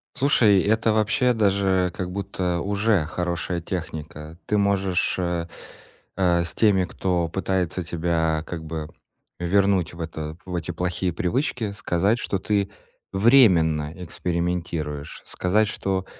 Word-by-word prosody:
Слушай, 115 -9 +4
это 110 +1 +2
вообще 110 +3 +2
даже 95 -4 +2
как 90 -1 -4
будто 90 -3 -2
уже 100 -4 +1
хорошая 85 +1 -2
техника. 80 -2 -6
Ты 105 - +2
можешь, 100 -2 +1
э 85 -1 -1 0.7
э, 90 -2 +3
с 85 - -5
теми, 100 -4 +4
кто 90 -1 -1
пытается 95 -1 -1
тебя 80 -1 0
как 80 -2 -5
бы 80 -1 -5 0.5
вернуть 95 -1 +2
в 85 - -12
это 80 -1 -5
в 90 -1 -5
эти 85 0 -3
плохие 90 +1 -2
привычки, 110 - -1
сказать, 100 +3 +1
что 100 - -2
ты 100 0 0 0.4
временно 90 - +4
экспериментируешь. 85 -4 -3
Сказать, 105 +4 +1
что 95 -2 -2
90 Hz, 125 wpm, -24 LUFS, 85-100 Hz, 0.7 s, Слушай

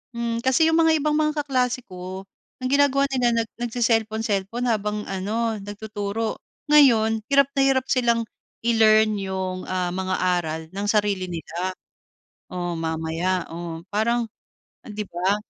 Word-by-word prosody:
Hmm, 235 0 -2
kasi 260 +5 +4
yung 325 - +3
mga 325 -1 +4
ibang 305 0 +2
mga 305 -1 +1
kaklase 255 -2 0
ko, 185 +1 -7 0.4
ang 255 - 0
ginagawa 280 -1 +4
nila, 240 -3 +2
nag 220 - -14
nagce-cellphone-cellphone 225 -2 0
habang 210 -2 -1
ano, 215 +4 -1
nagtuturo. 205 +1 -4 0.3
Ngayon, 225 -7 +5
hirap 280 -1 +4
na 275 - +2
hirap 265 -1 +2
silang 235 -3 +2 0.4
i-learn 220 -2 +4
yung, 190 -1 -4
ah, 180 -1 -1
mga 185 +1 -2 0.2
aral 160 -1 -4
nang 200 +2 -4
sarili 205 -3 +1
nila. 175 +2 -4 0.7
O, 175 -1 -3
mamaya, 165 +2 -1
oh, 170 -1 -6
parang 235 +3 +1 0.6
oh, - - -12
‘di 210 0 -4
ba? 185 +2 0
215 Hz, 140 wpm, -23 LUFS, 185-240 Hz, 0.7 s, Ngayon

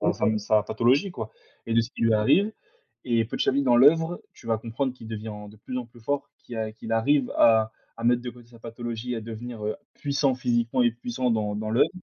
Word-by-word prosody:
enfin 110 0 +1
sa 110 +1 +2
sa 105 - 0
pathologie, 125 - +2
quoi 115 -10 -6 0.4
et 115 - -1
de 115 - +6
ce 115 - -7
qui - - -6
lui 115 -1 +4
arrive. 185 - +3 0.5
Et 115 -2 +2
petit 110 - -2
à - - +5
petit, 140 +1 +2
dans 120 -2 +5
l'œuvre, 165 +6 +5
tu - - -16
vas 115 -1 +1
comprendre 120 +4 -2
qu'il 115 -3 -12
devient 110 -1 -5 0.2
de 105 - -16
plus 125 +4 -5
en 125 - -5
plus 120 0 -18
fort, 140 +5 -2
qu'il 120 - -9
a 110 -1 -2
qu'il 110 +1 -9
arrive 130 +4 +2
à 110 -1 +5 0.3
à 115 - -7
mettre 120 0 +3
de 125 - -4
côté 120 -1 -16
sa 120 -1 -16
pathologie 120 +1 -5
et - - -3
à - - -3
devenir, 115 0 -7
heu, 110 - -1 0.2
puissant 140 -2 +1
physiquement 120 0 +1
et 120 - +4
puissant 120 +1 -2
dans 105 -2 0
dans 110 +1 -3
l'œuvre. 115 - +4
115 Hz, 245 wpm, -26 LUFS, 110-125 Hz, 0.5 s, de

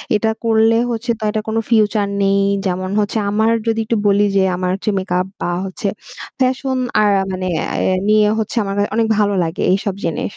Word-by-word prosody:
"এটা 220 +1 +1
করলে 225 0 +3 0.2
হচ্ছে 235 +1 -2
তো 220 - -7
এটা 215 - -2
কোনো 220 +1 0
ফিউচার 215 -2 +2
নেই" 195 0 +2 0.2
যেমন 185 0 -2
হচ্ছে 210 +2 -1
আমার 220 +2 +2 0.2
যদি 225 0 +1
একটু 230 +1 0
বলি 200 +1 +3
যে, 195 - +4
"আমার 180 0 -2
হচ্ছে 200 +2 -3
মেকআপ 180 0 -1
বা - - -1 0.2
হচ্ছে 200 +3 -4 0.5
ফ্যাশন 260 0 0 0.2
আর 210 - +4
আ - - -1
মানে 185 0 -4 0.2
অ্যা 185 - 0
নিয়ে 215 -1 +4
হচ্ছে 220 +2 -3
আমাকে 200 +1 -2
অনেক 225 -1 +2
ভালো 205 -1 +2
লাগে, 165 +1 -4
এইসব 200 -1 -1
জিনিস।" 165 - -2
210 Hz, 190 wpm, -18 LUFS, 190-225 Hz, 0.5 s, যে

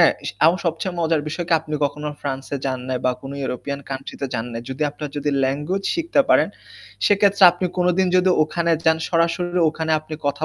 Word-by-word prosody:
S - - +3 0.2
আমার 170 +4 +4
সবচেয়ে 170 +2 -2
মজার 160 -2 +2
বিষয় 155 +3 -3
কি 170 - +1
আপনি 155 -1 -6
কখনো 150 +1 -3
ফ্রান্সে 135 0 -4
যান 130 -1 -1
নাই 130 - -1
বা 125 - +4
কোন 135 - -8
ইউরোপিয়ান 140 +2 -4
কান্ট্রি 135 0 -6
তে 140 - -1
যান 115 0 -2
নাই। 115 - -4
যদি 130 +3 -4
আপনারা 150 +1 -6
যদি 145 0 -1
ল্যাঙ্গুয়েজ 150 +9 -2
শিখতে 335 -4 +2
পারেন, - - +4 0.6
সেক্ষেত্রে 200 -1 +3
আপনি 180 +1 -2
কোনদিন 180 +1 +2
যদি 185 +1 +4
ওখানে 170 +2 -1
যান, 160 -1 +4
সরাসরি 170 +1 +1
ওখানে 160 0 -2
আপনি 155 0 -8
কথা 145 +2 0
160 Hz, 195 wpm, -21 LUFS, 140-175 Hz, 0.6 s, আমার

